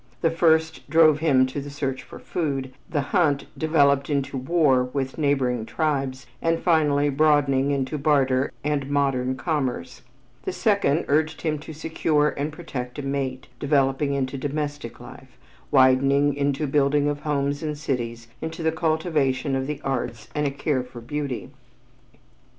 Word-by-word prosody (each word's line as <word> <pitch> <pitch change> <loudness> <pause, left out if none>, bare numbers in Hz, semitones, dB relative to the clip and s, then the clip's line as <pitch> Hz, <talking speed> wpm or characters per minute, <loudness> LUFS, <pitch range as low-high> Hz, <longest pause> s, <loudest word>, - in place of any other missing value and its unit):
The 165 - +2
first 160 -2 +2
drove 155 -1 +5
him 140 -5 +4
to 130 +2 -4
the 145 - -7
search 135 -2 -3
for - - -12
food, 135 -6 -3 0.2
the 145 - 0
hunt 150 -7 +2
developing 145 -2 +2
into 140 0 -3
war 135 -2 +2
with 130 +2 -4
neighboring 130 -5 +1
tribes 135 -5 -1 0.2
and 165 0 +1
finally 150 -4 +2
broadening 140 -2 +3
into 140 +1 -1
barter 135 -2 +2
and 145 -2 -1
modern 135 -3 +1
commerce; 130 - -3 0.4
the 185 - -3
second 180 -4 +1
urged 155 +2 +1
him 155 -2 0
to 155 - -9
secure 155 -1 +1
and 145 +2 -3
protect 135 -6 -6
a 145 - -4
mate, 135 -2 -3
developing 140 0 +1
into 135 0 -2
domestic 145 -4 -4
life, 130 0 -13 0.3
widening 140 +1 +4
into 140 +1 0
the 135 - -5
building 145 0 +3
of 145 0 -1
homes 145 -1 -1
and 150 -2 -3
cities, 120 -5 -3
into 160 +1 -5
the 160 - +2
cultivation 155 -5 0
of 135 0 -2
the 150 -1 -4
arts 120 -4 -3
and 150 -1 0
a - - +1
care 140 -1 -1
for 125 -1 -10
beauty. 140 +1 -4
140 Hz, 155 wpm, -24 LUFS, 130-155 Hz, 0.4 s, drove